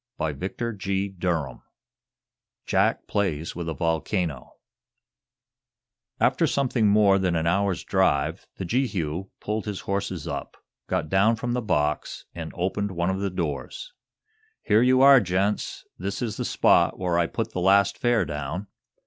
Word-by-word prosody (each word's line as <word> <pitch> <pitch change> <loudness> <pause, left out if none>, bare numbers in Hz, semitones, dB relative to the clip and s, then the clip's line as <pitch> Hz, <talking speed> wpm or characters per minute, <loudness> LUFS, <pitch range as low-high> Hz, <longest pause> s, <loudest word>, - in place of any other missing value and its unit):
CHAPTER 95 - -3
IX 95 0 -1 1.5
JACK - - +1
PLAYS 85 -6 -1
WITH 85 -1 -4
A 80 - -3
VOLCANO 80 - -2 1.7
After - - +3
something 125 -5 +1
more 100 -1 +5
than 90 -2 0
an 80 0 0
hour's 95 +1 +1
drive 95 -8 +1
the 95 - -5
Jehu 95 - -1
pulled 105 +1 -3
his 105 -3 -4
horses 95 -5 -3
up, - - -5 0.3
got - - -1
down 100 +6 +3
from 120 +1 -3
the 125 - 0
box 75 -9 -1
and 80 -2 -6
opened 95 +2 -2
one 85 +1 0
of 95 - -2
the 100 0 -1
doors. 85 - -4 0.7
"Here 110 +1 +4
you 130 +1 +4
are, 140 0 +9
young 120 - +3
gents. 95 +4 -1
This 100 +6 -3
is 110 -4 -3
the - - -3
spot - - +3
where 90 -2 0
I 85 - +2
put 115 +4 -3
the 90 - -3
last 100 +2 +4
fare 120 -5 +2
down. 80 +6 -4
95 Hz, 150 wpm, -25 LUFS, 85-105 Hz, 1.7 s, are